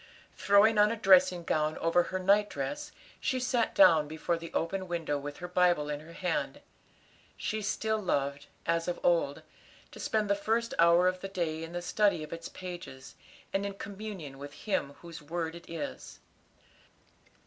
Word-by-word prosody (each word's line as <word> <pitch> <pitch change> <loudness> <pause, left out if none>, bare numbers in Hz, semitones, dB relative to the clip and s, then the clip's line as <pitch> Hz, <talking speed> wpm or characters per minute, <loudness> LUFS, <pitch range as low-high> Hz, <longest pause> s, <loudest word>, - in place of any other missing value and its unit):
Throwing 210 +2 +4
on 210 0 +6
a - - -1
dressing 185 -4 +5
gown 155 -1 0
over 165 +1 +3
her 185 - -2
night 200 +3 +3
dress, 295 +1 -4 0.3
she 260 - 0
sat 245 -2 0
down 160 - +6
before 160 +3 -2
the 165 0 -8
open 185 +3 -2
window 165 -4 -2
with 145 +1 -7
her 180 - -6
Bible 175 -4 +2
in 145 - -3
her 160 +2 -13
hand. 180 +1 -2 0.8
She 215 0 -2
still 220 +1 -1
loved, 140 -6 -1 0.2
as 165 0 0
of 175 - -2
old, 165 -5 +2 0.5
to - - -12
spend 215 -1 0
the 200 - +3
first 225 +3 -1
hour 170 +2 +6
of 185 0 0
the 195 - -4
day 165 -4 -2
in 165 +1 -8
the 175 0 -4
study 200 -4 +2
of 155 - -8
its 165 0 -7
pages, 175 -8 -9 0.4
and 195 - +1
in 200 -1 -4
communion 195 -9 -7
with 145 +1 -8
Him 165 -9 -1
whose 170 -2 -9
word 165 +2 -3
it 170 0 -12
is. 150 - -6
175 Hz, 175 wpm, -30 LUFS, 160-200 Hz, 0.8 s, on